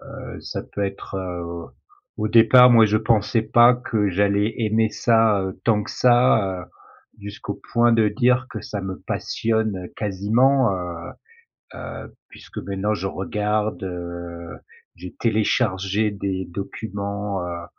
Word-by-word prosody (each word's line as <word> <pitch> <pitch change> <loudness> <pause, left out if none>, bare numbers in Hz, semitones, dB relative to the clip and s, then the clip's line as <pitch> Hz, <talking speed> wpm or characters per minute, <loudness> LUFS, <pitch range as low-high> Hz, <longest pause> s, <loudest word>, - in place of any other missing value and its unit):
heu, - - -8
ça - - -5
peut 100 - -4
être, 100 0 -5
heu 85 -2 -6 0.5
au 105 - -1
départ, 120 +3 +7
moi 115 -2 +7
je 105 +1 +2
pensais 110 0 +1
pas 120 +2 +5
que 110 -5 -1
j'allais 100 +3 +1
aimer 110 0 +1
ça, 110 -4 +2 0.2
tant 105 -3 +2
que - - -8
ça, 115 -7 +3
heu, - - -12 0.5
jusqu'au 100 0 -7
point 120 0 +4
de 110 -2 +3
dire 125 +4 +1
que - - -6
ça 100 -2 -6
me 95 -1 -6
passionne 110 -5 -2
quasiment, 110 +6 +2
heu 85 -2 -6 0.7
heu, - - -8 0.2
puisque - - -11
maintenant 100 +2 -2
je 95 -1 -4
regarde, 105 +2 -2
heu, 85 -2 -7 0.4
j'ai 90 - -10
téléchargé 105 -2 +1
des 95 -2 -4
documents, 100 0 -4
heu, 85 -1 -5
105 Hz, 135 wpm, -22 LUFS, 95-110 Hz, 0.7 s, départ